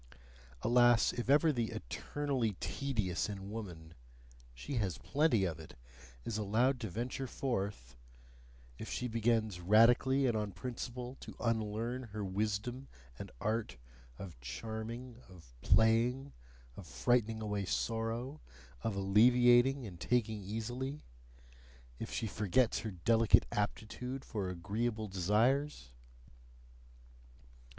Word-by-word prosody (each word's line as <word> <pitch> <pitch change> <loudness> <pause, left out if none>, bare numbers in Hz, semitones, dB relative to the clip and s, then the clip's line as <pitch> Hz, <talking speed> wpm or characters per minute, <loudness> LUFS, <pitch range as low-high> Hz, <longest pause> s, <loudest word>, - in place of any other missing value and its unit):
Alas, 120 -1 +5
if 120 +1 -4
ever 150 +2 +5
the 120 -3 -1
"eternally 130 - -2
tedious 100 0 -1
in 100 -1 -6
woman" 85 -8 -7 0.6
she 65 - -5
has 95 -9 -1
plenty 140 -9 +2
of 80 -3 -3
it! 80 - -12 0.5
is 110 -2 -2
allowed 120 +6 +2
to 110 - -4
venture 120 +6 -3
forth! 100 - -3 0.8
if - - -6
she 125 - -2
begins 110 -4 +1
radically 120 +8 +5
and 120 -3 +2
on 105 -2 -2
principle 125 +4 -6
to - - -10
unlearn 115 +2 -1
her 105 -2 -3
wisdom 110 +7 -2 0.3
and - - -6
art 110 - -2 0.4
of 90 -9 -9
charming, 115 - -6
of 80 -10 -16
playing, 120 +5 +3 0.4
of - - -10
frightening 115 -2 +1
away 105 -2 -2
sorrow, 115 +8 -2 0.4
of 115 -3 -2
alleviating 120 +6 +5
and 90 -5 -9
taking 110 +1 0
easily; 120 +8 -4 1.0
if - - -5
she - - -2
forgets 105 +4 +1
her 110 - -4
delicate 110 +4 +4
aptitude 125 +5 -3
for 100 -4 -3
agreeable 110 +5 -2
desires! 105 - +1
115 Hz, 115 wpm, -34 LUFS, 100-125 Hz, 1.0 s, Alas